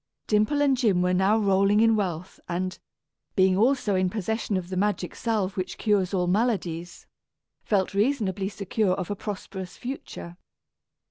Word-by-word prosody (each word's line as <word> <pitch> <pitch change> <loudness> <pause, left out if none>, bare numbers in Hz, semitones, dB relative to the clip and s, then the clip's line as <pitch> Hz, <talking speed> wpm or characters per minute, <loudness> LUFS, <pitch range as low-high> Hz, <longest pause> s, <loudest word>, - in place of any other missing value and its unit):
Dimple 215 +8 +2
and 275 -2 +4
Jim 210 -8 +2
were 180 0 +2
now 190 +4 +3
rolling 200 0 +3
in 225 0 +5
wealth 185 -3 -3
and, 185 +2 -2 0.6
being 190 -1 +4
also 225 0 +2
in 185 -1 +2
possession 220 +1 -2
of 180 -1 -5
the 185 - -4
magic 190 -2 0
salve 210 -5 -1
which 185 -1 -4
cures 200 -4 +1
all 185 -3 +1
maladies, 180 -4 -1 0.6
felt 195 -3 0
reasonably 200 -4 0
secure 200 -1 0
of 185 0 -4
a - - -1
prosperous 190 -2 -6
future. 240 -9 -7
195 Hz, 150 wpm, -26 LUFS, 185-215 Hz, 0.6 s, in